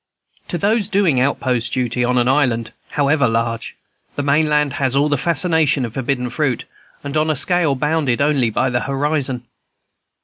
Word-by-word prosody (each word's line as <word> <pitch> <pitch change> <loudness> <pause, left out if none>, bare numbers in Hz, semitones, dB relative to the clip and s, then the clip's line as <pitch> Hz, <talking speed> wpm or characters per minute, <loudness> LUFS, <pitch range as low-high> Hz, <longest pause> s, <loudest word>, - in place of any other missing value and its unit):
To 175 - -3
those 205 +3 0
doing 190 -10 +2
outpost 125 -3 0
duty 125 -1 -1
on 125 +1 +1
an 120 0 +2
island, 125 -5 +1 0.2
however 145 -1 +2
large, 115 0 -2 0.4
the 145 - -2
main 150 +2 +2
land 150 -2 +1
has 130 -1 +1
all 145 +2 +2
the 145 - +2
fascination 155 -2 +2
of 115 - -8
forbidden 125 -1 -2
fruit, 140 -6 -1 0.4
and 140 +1 -5
on 155 +1 +1
a 155 - +1
scale 165 -1 +1
bounded 150 -3 0
only 140 -4 +2
by 130 +4 0
the 120 - +1
horizon. 135 -2 -2
140 Hz, 170 wpm, -19 LUFS, 125-155 Hz, 0.4 s, doing